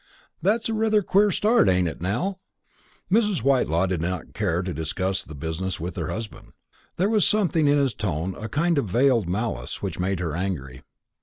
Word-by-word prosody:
That's 220 Hz, +3 st, +1 dB
rather 220 Hz, -1 st, +2 dB
a -, -, -9 dB
queer 200 Hz, +3 st, +4 dB
start, 210 Hz, -, +3 dB
ain't 90 Hz, -1 st, +2 dB
it, 80 Hz, -, -6 dB
Nell?" 175 Hz, -, -1 dB, 0.7 s
Mrs. 210 Hz, -, +2 dB
Whitelaw 125 Hz, -, +2 dB
did 90 Hz, -3 st, -2 dB
not 90 Hz, -1 st, -4 dB
care 90 Hz, -4 st, 0 dB
to 90 Hz, -1 st, -3 dB
discuss 95 Hz, +5 st, -2 dB
the 80 Hz, -, -11 dB
business 80 Hz, +5 st, -4 dB
with 85 Hz, +1 st, -5 dB
her -, -, -3 dB
husband. 110 Hz, -1 st, -7 dB, 0.4 s
There 185 Hz, -, +2 dB
was 215 Hz, -1 st, +3 dB
something 175 Hz, -7 st, +2 dB
in 145 Hz, +1 st, +4 dB
his 135 Hz, -4 st, +1 dB
tone, 95 Hz, -3 st, -2 dB
a 110 Hz, -, -5 dB
kind 160 Hz, +6 st, +1 dB
of 110 Hz, -, -3 dB
veiled 120 Hz, -3 st, +3 dB
malice, 90 Hz, -, -3 dB
which -, -, -4 dB
made 95 Hz, 0 st, -1 dB
her 80 Hz, -4 st, -2 dB
angry. 80 Hz, -9 st, -4 dB
100 Hz, 185 wpm, -24 LUFS, -, 0.7 s, queer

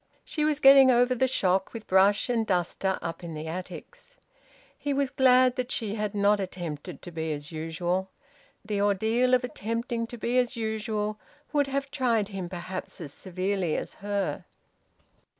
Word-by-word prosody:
She 305 Hz, -, -2 dB
was 300 Hz, -1 st, +1 dB
getting 270 Hz, -1 st, +8 dB
over 245 Hz, 0 st, +4 dB
the 260 Hz, +1 st, +2 dB
shock 190 Hz, -6 st, +1 dB
with 225 Hz, -2 st, -7 dB
brush 195 Hz, +2 st, +4 dB
and 240 Hz, -2 st, +1 dB
duster 185 Hz, +1 st, 0 dB
up 165 Hz, +1 st, -5 dB
in 165 Hz, -2 st, -6 dB
the 155 Hz, +1 st, -5 dB
attics. 185 Hz, -, -8 dB, 0.6 s
He 285 Hz, -, -2 dB
was 275 Hz, -1 st, 0 dB
glad 255 Hz, -1 st, +4 dB
that 255 Hz, 0 st, -2 dB
she 220 Hz, -6 st, -2 dB
had 210 Hz, -1 st, -3 dB
not 205 Hz, 0 st, +3 dB
attempted 175 Hz, -6 st, -6 dB
to 175 Hz, -, -8 dB
be 160 Hz, -1 st, -3 dB
as 145 Hz, 0 st, -6 dB
usual. 175 Hz, +4 st, -2 dB, 0.6 s
The 205 Hz, -1 st, -1 dB
ordeal 220 Hz, +5 st, +3 dB
of 250 Hz, -, 0 dB
attempting 230 Hz, 0 st, -3 dB
to 240 Hz, -, -8 dB
be 240 Hz, +3 st, +1 dB
as 250 Hz, +1 st, 0 dB
usual 215 Hz, -1 st, -2 dB, 0.3 s
would 290 Hz, -2 st, +2 dB
have 275 Hz, 0 st, -3 dB
tried 230 Hz, -5 st, +1 dB
him 190 Hz, -3 st, -5 dB
perhaps 185 Hz, +1 st, -6 dB
as 145 Hz, -5 st, -8 dB
severely 185 Hz, -2 st, -2 dB
as -, -, -5 dB
her. 200 Hz, -1 st, -2 dB
210 Hz, 170 wpm, -27 LUFS, 185-250 Hz, 0.6 s, getting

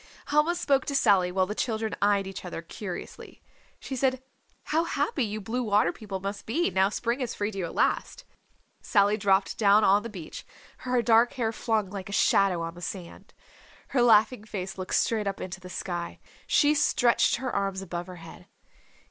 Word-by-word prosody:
Helma 300 Hz, +4 st, +3 dB
spoke 275 Hz, -6 st, +1 dB
to 280 Hz, -, -3 dB
Sally, 200 Hz, -10 st, +3 dB
while 185 Hz, 0 st, +2 dB
the 205 Hz, -, -4 dB
children 220 Hz, -1 st, -2 dB
eyed 200 Hz, -1 st, +3 dB
each 195 Hz, 0 st, -7 dB
other 175 Hz, -2 st, -6 dB
curiously. 180 Hz, +1 st, -8 dB, 0.4 s
She 270 Hz, -, -6 dB
said, 260 Hz, 0 st, 0 dB, 0.4 s
"How 320 Hz, +2 st, +1 dB
happy 335 Hz, -, -1 dB
you 215 Hz, -1 st, -3 dB
Blue 225 Hz, +5 st, -3 dB
Water 205 Hz, -6 st, +2 dB
People 200 Hz, -3 st, -6 dB
must 200 Hz, +1 st, -6 dB
be 320 Hz, -, 0 dB
now 190 Hz, +2 st, +3 dB
Spring 235 Hz, +4 st, -2 dB
has 250 Hz, -3 st, -3 dB
freed 205 Hz, +1 st, -2 dB
you 195 Hz, -3 st, -3 dB
at 165 Hz, -, -8 dB
last!" -, -, 0 dB, 0.6 s
Sally 205 Hz, -1 st, +3 dB
dropped 195 Hz, -2 st, +1 dB
down 210 Hz, 0 st, +5 dB
on 200 Hz, +1 st, +5 dB
the 230 Hz, -, -7 dB
beach, 180 Hz, -7 st, -9 dB, 0.3 s
her 250 Hz, -1 st, 0 dB
dark 230 Hz, +2 st, +4 dB
hair 230 Hz, -4 st, -1 dB
flung 220 Hz, -3 st, -1 dB
like 195 Hz, -2 st, -6 dB
a -, -, -6 dB
shadow 195 Hz, -4 st, +3 dB
on 165 Hz, 0 st, -5 dB
the 175 Hz, -, -12 dB
sand. 180 Hz, 0 st, -8 dB, 0.5 s
Her 265 Hz, -, +1 dB
laughing 220 Hz, 0 st, +4 dB
face 195 Hz, -3 st, -5 dB
looked 185 Hz, -1 st, -3 dB
straight 215 Hz, -3 st, +1 dB
up 195 Hz, -, -3 dB
into 185 Hz, +1 st, -6 dB
the 180 Hz, 0 st, -11 dB
sky. 175 Hz, -1 st, -5 dB, 0.3 s
She 295 Hz, +1 st, +4 dB
stretched 270 Hz, -5 st, +3 dB
her 255 Hz, +1 st, -4 dB
arms 195 Hz, -1 st, -1 dB
above 175 Hz, -1 st, -5 dB
her 185 Hz, -, -9 dB
head. 165 Hz, -1 st, -13 dB
205 Hz, 190 wpm, -27 LUFS, 190-240 Hz, 0.6 s, down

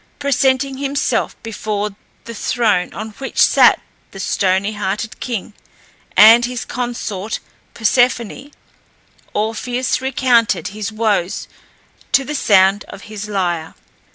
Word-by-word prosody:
Presenting 270 Hz, -1 st, +1 dB
himself 275 Hz, -3 st, -1 dB
before 210 Hz, -2 st, -3 dB, 0.3 s
the 230 Hz, -, -7 dB
throne 210 Hz, -5 st, 0 dB
on 215 Hz, +1 st, -6 dB
which 270 Hz, -, -7 dB
sat -, -, +6 dB, 0.3 s
the 195 Hz, -, -11 dB
stony 195 Hz, +2 st, 0 dB
hearted 210 Hz, +2 st, -3 dB
king 225 Hz, -4 st, -4 dB, 0.6 s
and 225 Hz, +3 st, +8 dB
his 245 Hz, -1 st, -4 dB
consort 225 Hz, -4 st, -4 dB, 0.4 s
Persephone, 245 Hz, +3 st, +1 dB, 0.9 s
Orpheus 245 Hz, +5 st, -1 dB
recounted 240 Hz, -8 st, +2 dB
his 210 Hz, +1 st, -5 dB
woes 215 Hz, -5 st, -1 dB, 0.7 s
to 270 Hz, -, +5 dB
the 295 Hz, -, -5 dB
sound 195 Hz, -6 st, +4 dB
of 195 Hz, -, -11 dB
his 210 Hz, 0 st, -6 dB
lyre. 175 Hz, -5 st, -2 dB
220 Hz, 110 wpm, -18 LUFS, 200-250 Hz, 0.9 s, and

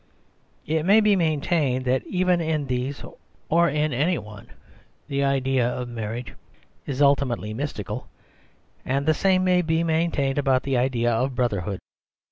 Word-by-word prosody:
It 160 Hz, +1 st, 0 dB
may 200 Hz, +5 st, +6 dB
be 210 Hz, -2 st, +4 dB
maintained 150 Hz, -5 st, 0 dB
that 130 Hz, +1 st, +1 dB
even 180 Hz, -1 st, +1 dB
in 155 Hz, -3 st, -1 dB
these, 130 Hz, +2 st, -3 dB, 0.5 s
or 170 Hz, +1 st, +4 dB
in 150 Hz, 0 st, 0 dB
any 155 Hz, +8 st, +1 dB
one, 105 Hz, -1 st, -10 dB, 0.6 s
the 140 Hz, 0 st, -1 dB
idea 135 Hz, -2 st, +1 dB
of 125 Hz, 0 st, -4 dB
mar 115 Hz, -3 st, -4 dB
riage 120 Hz, +1 st, -7 dB, 0.5 s
is 140 Hz, 0 st, 0 dB
ultimately 130 Hz, -6 st, +1 dB
mystical; 115 Hz, -, -5 dB, 0.8 s
and 140 Hz, +2 st, -1 dB
the 155 Hz, -, +4 dB
same 185 Hz, +2 st, +2 dB
may 180 Hz, -1 st, +3 dB
be 160 Hz, 0 st, 0 dB
maintained 160 Hz, -4 st, 0 dB
about 135 Hz, -2 st, +2 dB
the 135 Hz, -1 st, -1 dB
idea 120 Hz, -1 st, +1 dB
of 130 Hz, +3 st, -1 dB
brotherhood. 100 Hz, -6 st, -1 dB
140 Hz, 150 wpm, -24 LUFS, 125-160 Hz, 0.8 s, may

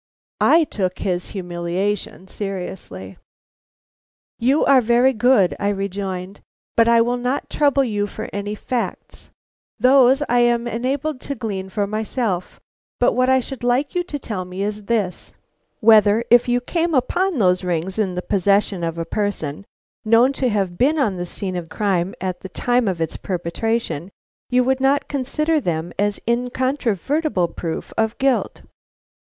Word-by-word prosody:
I 330 Hz, 0 st, +5 dB
took 185 Hz, -10 st, -2 dB
his 180 Hz, -2 st, -2 dB
humiliation 180 Hz, +1 st, -3 dB
seriously. 180 Hz, -, -6 dB, 1.2 s
"You 265 Hz, +6 st, +3 dB
are 265 Hz, -2 st, +6 dB
very 240 Hz, +3 st, +3 dB
good," 215 Hz, -, +3 dB
I 200 Hz, -, 0 dB
rejoined, 195 Hz, -1 st, -4 dB, 0.3 s
"but 230 Hz, 0 st, +4 dB
I 235 Hz, 0 st, +5 dB
will 240 Hz, +2 st, +1 dB
not 250 Hz, +3 st, -2 dB
trouble 280 Hz, -2 st, +3 dB
you 205 Hz, -4 st, -1 dB
for 220 Hz, +2 st, -7 dB
any 205 Hz, +1 st, -3 dB
facts, 240 Hz, +2 st, -5 dB, 0.5 s
those 260 Hz, +3 st, +5 dB
I 245 Hz, +1 st, +2 dB
am 240 Hz, 0 st, +2 dB
enabled 260 Hz, +4 st, -2 dB
to 280 Hz, -, -4 dB
glean 200 Hz, -5 st, -4 dB
for 205 Hz, +2 st, -1 dB
myself; 215 Hz, -2 st, -2 dB, 0.4 s
but -, -, +3 dB
what 255 Hz, +1 st, +2 dB
I 260 Hz, 0 st, +5 dB
should 260 Hz, 0 st, -7 dB
like 250 Hz, +4 st, +1 dB
you 355 Hz, -, +1 dB
to 295 Hz, -, -4 dB
tell 210 Hz, -8 st, -4 dB
me 180 Hz, +2 st, -5 dB
is 210 Hz, 0 st, -4 dB
this: 205 Hz, -5 st, -2 dB, 0.5 s
Whether 215 Hz, 0 st, +5 dB
if 240 Hz, 0 st, +6 dB
you 245 Hz, 0 st, +1 dB
came 335 Hz, +4 st, -1 dB
upon 350 Hz, +7 st, +1 dB
those 185 Hz, -4 st, +2 dB
rings 180 Hz, +3 st, -2 dB
in 190 Hz, -4 st, 0 dB
the 180 Hz, -, -3 dB
possession 200 Hz, -1 st, +1 dB
of 165 Hz, 0 st, -2 dB
a 165 Hz, -, -3 dB
person 200 Hz, -4 st, -3 dB, 0.4 s
known 230 Hz, +4 st, +4 dB
to 265 Hz, -2 st, 0 dB
have 195 Hz, -5 st, -1 dB
been 295 Hz, +5 st, +3 dB
on 215 Hz, -10 st, +1 dB
the 175 Hz, 0 st, -4 dB
scene 185 Hz, +1 st, -5 dB
of 170 Hz, -2 st, -5 dB
crime 190 Hz, -3 st, -1 dB
at 185 Hz, -1 st, -3 dB
the 190 Hz, -, -9 dB
time 245 Hz, +4 st, +1 dB
of 180 Hz, -4 st, -1 dB
its 165 Hz, -, -2 dB
perpetration, 185 Hz, 0 st, -2 dB, 0.4 s
you 250 Hz, 0 st, +3 dB
would 265 Hz, +1 st, +1 dB
not 270 Hz, +2 st, +2 dB
consider 300 Hz, +4 st, 0 dB
them 170 Hz, -3 st, -2 dB
as 205 Hz, 0 st, +1 dB
an 235 Hz, +1 st, +1 dB
incontrovertible 260 Hz, -, 0 dB
proof 165 Hz, -1 st, -5 dB
of 220 Hz, 0 st, 0 dB
guilt?" 270 Hz, -2 st, 0 dB
215 Hz, 160 wpm, -21 LUFS, 185-255 Hz, 1.2 s, are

